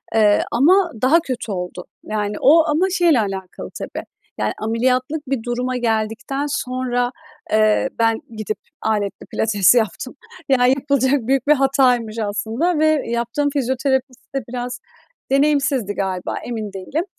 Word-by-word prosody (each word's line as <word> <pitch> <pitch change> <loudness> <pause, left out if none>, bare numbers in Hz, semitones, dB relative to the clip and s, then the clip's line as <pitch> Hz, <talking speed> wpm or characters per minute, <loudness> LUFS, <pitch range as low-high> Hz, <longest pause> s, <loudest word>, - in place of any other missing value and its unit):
eee, 210 -2 +4
ama 345 +8 +4
daha 280 +7 +5
kötü 255 -8 -5
oldu. 180 -1 -5 0.2
Yani, 210 -1 -2
o 320 +4 +6
ama 320 +5 +2
şeyle 345 -7 +3
alakalı 195 -3 -4
tabii, - - -6 0.3
yani, - - -1
ameliyatlık 255 +6 0
bir 260 -4 -2
duruma 250 +1 -2
geldikten 230 +4 -1
sonra, 250 -2 -1 0.4
eee, 215 0 +3
ben 225 -1 +2 0.2
gidip 215 0 -3 0.2
aletli 210 -2 -2
pilates 210 0 +3
yaptım. 235 - -1 0.3
Yani, 250 -2 +4
yapılacak 270 -2 +1
büyük 270 0 +1
bir 300 - +7
hataymış 255 -5 +2
aslında 225 - -1
ve 310 - +4 0.2
yaptığım 235 +5 -1
fizyoterapist 265 -1 -2
de 270 - -1
biraz 245 0 -4 0.5
deneyimsizdi 275 -6 +2
galiba, 190 -2 -3
emin 220 -4 -5
değilim. 265 - -3
250 Hz, 135 wpm, -20 LUFS, 220-275 Hz, 0.5 s, bir